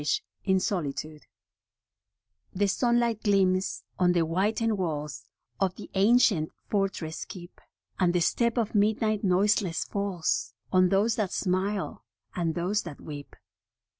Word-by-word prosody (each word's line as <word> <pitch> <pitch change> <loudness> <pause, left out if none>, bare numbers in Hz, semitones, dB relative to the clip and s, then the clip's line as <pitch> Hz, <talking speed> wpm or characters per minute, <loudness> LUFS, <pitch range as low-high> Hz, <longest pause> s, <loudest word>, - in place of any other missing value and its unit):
* - - -51
HE 190 -1 +2
sunlight 175 -7 -1 2.2
gleams 190 -2 +2 0.2
on 180 -1 +4
the 175 - +2
whitened 210 +6 +1
walls 150 -8 -3 0.3
Of 190 -2 +1
the - - -10
ancient 200 -5 +4 0.2
fortress 195 -6 -2
keep, 175 -1 -11 0.4
And 180 -2 +3
the 175 - +1
step 235 +7 +1
of 225 -3 0
midnight 215 0 +2
noiseless 190 -1 +2
falls 180 - -2 0.2
On 185 -1 +5
those 205 +4 +2
that 205 -4 0
smile 190 +1 -1 0.3
and 165 -3 -1
those 190 +5 0
that 165 -5 -9
weep. 145 -2 -9
185 Hz, 120 wpm, -28 LUFS, 175-205 Hz, 2.2 s, On